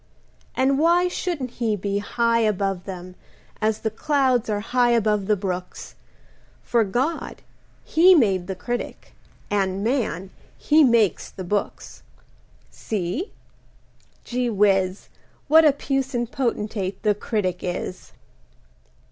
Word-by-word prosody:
And 270 +1 +2
why 345 +3 +4
Shouldn't 335 -8 -3
he 230 -3 -1
be 200 0 -2
high 230 +2 +1
Above 195 -4 0
them 185 -1 -8 0.5
as 215 0 0
the 220 - -1
clouds 260 -2 +1
Are 205 -1 0
high 245 +3 +1
above 210 -4 +1
the 210 - +3
brooks, 185 -2 -5 0.7
For 235 -2 +2
God, 255 - -2 0.4
He 360 +3 +6
made 195 - +2
the 190 - -4
Critic, 240 +6 -5 0.4
And 195 -1 0
man, 210 - -1 0.3
he 310 +1 +4
makes 230 - +2
the 190 - -8
books. 200 +3 -3 0.7
See? 215 - -3 0.9
Gee 245 0 -1
whiz, 195 -3 +1 0.4
What 320 +2 +6
a 300 - +7
puissant 270 -3 -2
potentate 210 -6 -2
the 210 -1 +3
Critic 200 -4 -2
is. 180 +1 -5
220 Hz, 120 wpm, -23 LUFS, 195-255 Hz, 0.9 s, a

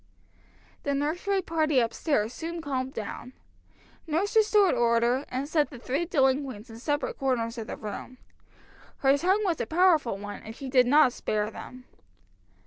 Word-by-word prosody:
The 285 -1 -1
nursery 355 +7 -1
party 310 -4 +1
up 230 -2 0
stairs 235 -7 0
soon 335 +3 -5
calmed 265 -4 -3
down. 225 +4 -6 0.7
Nurse 345 +8 -1
restored 425 -3 +5
order, 235 +3 +2
and 260 +2 -3
set 300 -1 +1
the 270 - -10
three 270 +7 -2
delinquents 265 - 0
in 225 - -10
separate 290 +3 -2
corners 240 -3 -1
of 225 - -6
the - - -6
room. 215 +4 -7 0.8
Her 270 0 +5
tongue 375 +8 +2
was 345 -5 0
a - - -3
powerful 320 - +3
one, 205 +1 -7
and 220 +1 -9
she 270 +1 -7
did 255 -2 +4
not 285 -1 +5
spare 210 -2 -2
them. 250 +2 -10
270 Hz, 160 wpm, -27 LUFS, 240-320 Hz, 0.8 s, restored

